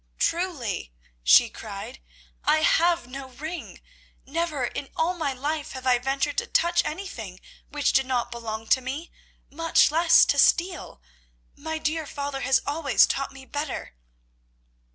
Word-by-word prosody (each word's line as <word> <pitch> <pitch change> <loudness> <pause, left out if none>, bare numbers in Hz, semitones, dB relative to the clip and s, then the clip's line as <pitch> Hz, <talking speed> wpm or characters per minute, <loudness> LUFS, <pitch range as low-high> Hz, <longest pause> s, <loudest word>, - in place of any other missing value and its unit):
"Truly," 285 - -1 0.3
she - - +7
cried, - - -9 0.4
"I 310 - +3
have 340 +2 +3
no 265 +1 -8
ring. 315 +7 -7 0.5
Never 305 -2 -1
in 275 - -5
all 335 +3 +1
my 315 -6 -2
life 290 +3 -3
have 260 -1 -8
I 250 -1 +4
ventured 270 +3 -1
to 475 - -5
touch 345 -4 +2
anything 255 - -6 0.3
which 290 -1 0
did 265 -1 +3
not 250 -2 -1
belong 225 -2 -5
to 260 - +4
me, 275 +7 -6 0.4
much 330 0 +3
less 330 +1 +6
to - - +1
steal. 345 - +2 0.5
My 320 +2 -4
dear 315 0 -2
father 280 -1 -4
has 265 0 +2
always 285 -3 +3
taught 275 0 -2
me 270 -1 -12
better." 290 - -5
285 Hz, 145 wpm, -25 LUFS, 260-330 Hz, 0.5 s, she